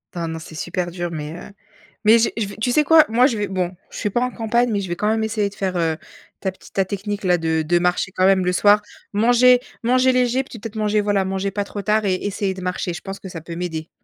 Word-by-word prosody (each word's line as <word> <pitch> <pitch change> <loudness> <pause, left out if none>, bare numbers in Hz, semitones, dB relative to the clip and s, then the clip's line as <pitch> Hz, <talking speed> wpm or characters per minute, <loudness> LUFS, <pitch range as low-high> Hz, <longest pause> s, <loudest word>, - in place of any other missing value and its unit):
Enfin 170 -1 -3
non, 160 0 -4
c'est 160 0 -11
super 175 +2 -3
dur, 175 0 -4
mais 155 -1 -5
heu 175 - -9 0.6
mais 220 +2 +7
j'ai 230 - +1
je 225 - 0
vais 200 - -9
tu 245 +3 0
sais 300 - +4
quoi? 315 +1 +6
Moi 245 +3 +5
je 240 -6 -2
vais 205 -1 -1
bon, 185 -1 -2
je - - -10
suis 210 - -1
pas 240 +4 0
en 250 - +1
campagne, 235 +1 +1
mais 205 -2 0
je 190 - -6
vais 175 - -2
quand 210 - -1
même 220 0 +1
essayer 215 -1 0
de 200 - -16
faire, 185 -2 -2
heu, 165 -2 +1 0.5
ta 190 - -1
petite 185 - -18
ta 195 - +2
technique-là, 200 -2 -1
de 160 -1 0
de 175 +3 +2
marcher 180 +1 0
quand 185 0 +1
même 190 -1 +4
le 180 - +2
soir. 205 +3 +5 0.3
Manger 245 +4 +5 0.2
manger 255 +2 +4
léger 250 +1 +2
puis 245 -3 -11
peut-être 220 +1 -8
manger, 215 -1 +1
voilà, 205 -1 +1
manger 190 +1 -2
pas 205 +1 -2
trop 205 0 -6
tard 215 +2 +1
et 190 -2 +2
essayer 200 0 -2
de 185 - -9
marcher. 180 -1 -2
Je 175 - -7
pense 195 0 -7
que 190 - -9
ça 175 - -7
peut 170 +1 -8
m'aider. 165 -2 -4
200 Hz, 275 wpm, -21 LUFS, 180-220 Hz, 0.6 s, mais